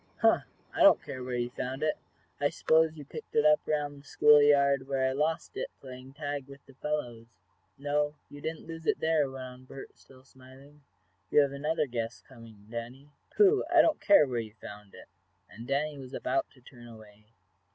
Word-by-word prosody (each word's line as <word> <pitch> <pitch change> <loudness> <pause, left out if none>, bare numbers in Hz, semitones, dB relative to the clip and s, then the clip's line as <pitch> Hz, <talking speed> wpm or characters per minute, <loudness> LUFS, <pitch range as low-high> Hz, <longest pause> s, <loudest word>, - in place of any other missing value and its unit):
"Huh! - - +4 0.3
I - - -3
don't - - +7
care 130 -2 -7
where 125 0 -4
you 120 0 -2
found 130 +3 -4
it. 155 - +1 0.4
I 145 - +2
s'pose 160 +1 +2
you 145 - -9
picked 465 0 -10
it 450 - +3
up 305 0 +6
around 145 -2 -2
the 145 - -21
school 150 0 +6
yard, 140 -2 +3
where 135 -1 0
I - - 0
lost 155 +4 -2
it, - - -4
playing 130 0 -11
tag 145 -2 -5
with 140 0 -14
the 135 - -17
fellows." 125 -5 -4 0.5
"No, 145 +1 -1
you 145 - -12
didn't 160 +1 -5
lose 165 -1 -9
it - - +2
there," 160 -3 +1
went 130 -1 -8
on 130 0 -11
Bert, 135 +1 -11
still 130 -1 -19
smiling. 135 +2 -17 0.5
"You 150 - +5
have 140 -1 +1
another 150 +3 -1
guess 115 -3 -5
coming, 115 -5 -15
Danny." 120 +5 -8 0.3
"Pooh! 415 0 +5
I 340 -3 +7
don't 315 -1 +1
care 200 -7 +6
where 125 -2 -2
you 110 -1 -7
found 105 -2 -12
it," - - -13 0.4
and 115 +3 -11
Danny 145 +1 -1
was 130 0 -9
about 340 -1 -1
to 130 - -21
turn 120 -1 -14
away. 110 -2 -15
140 Hz, 200 wpm, -29 LUFS, 125-150 Hz, 0.5 s, don't